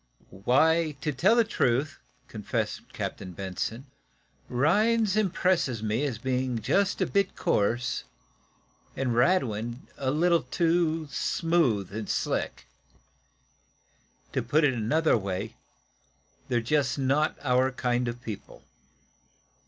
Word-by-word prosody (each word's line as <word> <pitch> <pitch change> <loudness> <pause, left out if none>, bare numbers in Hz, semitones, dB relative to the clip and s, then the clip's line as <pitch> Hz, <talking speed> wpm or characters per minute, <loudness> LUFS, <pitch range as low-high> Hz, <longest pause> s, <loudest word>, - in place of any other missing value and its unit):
"Why, 160 +4 +3
to 150 - -1
tell 180 - +3
the 235 - +5
truth," 140 - 0 0.3
confessed - - -4
Captain 90 -1 -5
Benson, 100 +7 -4 0.6
"Rhinds 205 - +2
impresses 180 - +1
me 110 +6 0
as 130 -6 -2
being 125 0 -1
just 195 - +1
a - - +4
bit 200 -1 0
coarse, 120 +4 0 0.9
and 130 -2 -1
Radwin 120 - +1
a 130 - 0
little 170 +4 +3
too 165 -2 0
smooth 130 - +1
and 110 -2 -5
slick. - - -2 1.7
To - - +1
put 155 +2 +2
it 140 -3 +4
another 150 +8 +2
way, 100 +2 -4 0.9
they're 120 -1 +1
not - - -14
just 140 0 +1 0.5
our 130 0 +2
kind 125 -1 -1
of 120 +1 -5
people. 110 -3 -8
130 Hz, 115 wpm, -27 LUFS, 120-165 Hz, 1.7 s, the